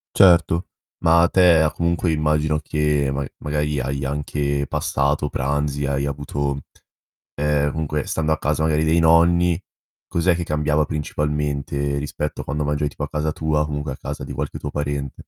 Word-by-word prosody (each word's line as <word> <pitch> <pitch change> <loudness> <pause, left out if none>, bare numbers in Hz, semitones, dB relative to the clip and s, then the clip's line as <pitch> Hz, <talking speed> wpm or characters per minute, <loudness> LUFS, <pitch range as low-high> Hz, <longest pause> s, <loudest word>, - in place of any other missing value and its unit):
Certo. 85 -1 +5 0.4
Ma 85 +1 +6
a 85 - +4
te 90 -4 +5
ha 75 - +2
comunque 85 0 0
immagino, 75 0 +1
che 75 -2 0
ma 70 0 -2
magari 75 0 -1
hai 70 +2 -2
anche 70 0 -1
passato 75 -2 0
pranzi, 70 +1 -1
hai 70 0 -1
avuto 70 0 -2 0.8
ehm, 75 -1 +1
comunque 75 -2 -2
stando 80 -1 -1
a 80 - +2
casa 75 +2 0
magari 80 0 +2
dei 80 +2 +3
nonni 85 +1 +4 0.5
cos'è 85 +1 +2
che 85 - -2
cambiava 75 0 +1
principalmente 75 -1 -2
rispetto 75 +1 -3
a - - -7
quando 75 +2 -2
mangiavi 75 0 0
tipo - - -6
a - - -3
casa 75 0 -1
tua 75 -1 0
o - - +1
comunque 75 -1 -4
a - - -10
casa - - -6
di - - -7
qualche - - -4
tuo 75 - -4
parente? 70 -2 -3
75 Hz, 175 wpm, -22 LUFS, 70-80 Hz, 0.8 s, Ma